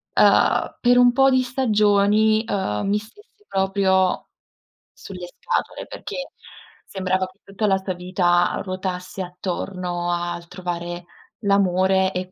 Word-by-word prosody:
uhm, - - +3
per 245 0 +4
un 245 0 +6
po' 270 +1 +5
di 260 -1 +3
stagioni, 215 -3 +3
uhm, 105 - -1
mi 205 +1 +2
stesse 415 - -14
proprio 190 -1 +1 0.7
sulle 180 -2 -9
scatole, - - -3
perché - - -7 0.6
sembrava 185 -1 -1
che 185 +1 -20
tutta 195 +2 -2
la 195 -1 +3
sua 190 0 -4
vita 175 -1 +1
ruotasse 185 0 -5
attorno 180 -1 -4
al 175 0 -3
trovare 175 -1 -5 0.4
l'amore 190 -2 +2
e 185 0 -4
190 Hz, 120 wpm, -22 LUFS, 180-210 Hz, 0.7 s, un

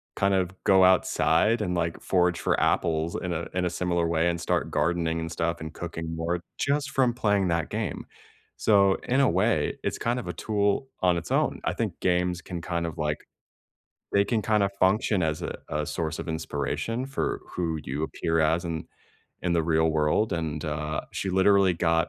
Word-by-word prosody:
kind 100 0 +2
of 90 -1 0
go 95 -1 +5
outside 95 +3 +3
and, 90 -4 -1
like, 85 -1 -1
forage 90 -2 +2
for - - +1
apples 80 0 +1
in 90 -1 -3
a 85 0 -3
in 90 0 0
a - - +1
similar 85 -1 0
way 85 +1 +2
and 85 0 -2
start - - 0
gardening 85 -1 0
and 80 0 -4
stuff 85 +1 -1
and 80 0 -6
cooking 80 -1 -5
more, 85 +2 -1 0.2
just 140 0 0
from 130 -3 +2
playing 105 -5 +1
that 85 -1 0
game, 105 -7 -3 0.5
so, 100 -2 +4
in 130 +3 +3
a 135 - +4
way, - - +1
it's - - -1
kind 120 +2 -1
of 120 - -7
a 90 - -3
tool 105 +7 0
on 90 -2 +3
its 85 - -6
own; - - +1
I - - 0
think - - -3
games 90 0 +1
can 90 -2 -6
kind 85 0 -2
of, 80 - -5
like 75 -1 -1 1.0
they 100 0 +4
can 110 +1 0
kinda 105 -1 +2
function 95 0 +3
as 80 -1 -1
a - - -4
a 75 0 -1
source 80 -2 -3
of - - -5
inspiration 80 - -2
for 140 - -2
who 85 -3 -2
you 70 +4 -3
appear 80 +1 0
as 80 +3 +2
in 80 -2 -4 0.6
in 90 - 0
the 85 - +2
real 80 0 +2
world, 80 +8 +1
and, 80 -3 -3
uh, 75 0 -2
she 95 - -2
literally 95 0 +4
got 85 -1 +1
85 Hz, 195 wpm, -26 LUFS, 80-100 Hz, 1.0 s, go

